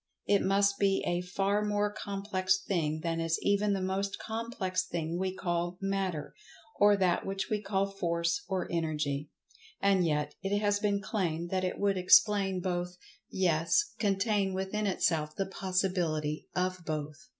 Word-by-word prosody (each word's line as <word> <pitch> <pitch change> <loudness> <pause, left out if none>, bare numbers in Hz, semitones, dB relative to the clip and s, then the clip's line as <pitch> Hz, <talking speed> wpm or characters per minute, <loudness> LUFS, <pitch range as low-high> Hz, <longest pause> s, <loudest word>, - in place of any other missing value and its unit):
It 200 -1 +3
must 200 +1 +2
be 195 -1 +2
a 175 0 0
far 195 +3 0
more 205 0 0
complex 195 -2 -1
thing 155 -5 -1
than 165 -1 -1
is 165 0 0
even 200 0 +2
the 195 - -1
most 195 +1 -1
complex 220 -5 -2
thing 170 -1 -3
we 190 0 0
call 175 -1 -2
Matter, 190 -7 -2 0.5
or 205 0 +6
that 185 -3 +2
which 195 +1 -3
we 210 -1 0
call 195 -1 0
Force 170 -3 -1
or 190 -1 -1
Energy. 150 -3 -1 0.5
And 195 -2 +3
yet, 150 -2 0
it 195 +1 0
has 205 -1 +1
been 205 -1 +1
claimed 175 -5 -2
that 185 -1 0
it 185 - -1
would 200 -2 +1
explain 195 0 +5
both—yes, 180 - -1
contain 200 -1 +1
within 195 +2 -1
itself 155 -5 0
the 195 - -1
possibility 180 -6 -1
of 185 0 0
both. 155 +2 -5
190 Hz, 150 wpm, -30 LUFS, 170-200 Hz, 0.5 s, or